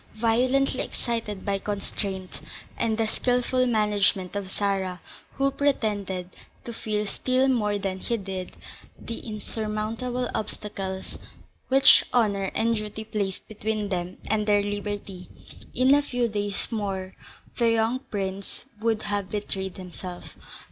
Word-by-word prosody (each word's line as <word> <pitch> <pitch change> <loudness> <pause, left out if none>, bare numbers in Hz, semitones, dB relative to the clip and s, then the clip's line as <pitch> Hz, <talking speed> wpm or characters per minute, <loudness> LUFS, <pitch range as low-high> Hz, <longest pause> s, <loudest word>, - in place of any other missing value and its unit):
Violently 255 +4 +3
excited 225 -5 -3
by 200 -1 +1
constraint, 195 -2 -4 0.3
and 220 -1 +1
the 225 - +2
skilful 250 +2 +2
management 205 -4 +2
of 200 -2 -3
Sarah, 190 -2 0 0.3
who 275 0 +2
pretended 205 -10 0 0.3
to 235 - -5
feel 210 -1 -1
still 255 +6 +2
more 210 -6 +2
than 195 -2 -2
he 235 +4 0
did 190 -3 -5 0.5
the 230 - -5
insurmountable 220 +3 -2
obstacles 195 -3 -4 0.5
which 270 +1 +8
honour 205 -5 +3
and 230 +1 +3
duty 215 +1 -5
placed 205 -3 -2
between 215 -1 -2
them 180 -1 -2
and 210 0 +1
their 205 -1 +5
liberty, 205 -2 -4 0.5
in 260 +2 +6
a 290 - +6
few 245 -4 0
days 205 -1 -1
more 195 -4 -2 0.5
the 235 -1 +5
young 230 +2 +2
prince 200 -5 -4 0.2
would 225 -1 +1
have 205 -2 -1
betrayed 195 -2 -3
himself. 180 -1 -8
210 Hz, 125 wpm, -27 LUFS, 195-230 Hz, 0.5 s, which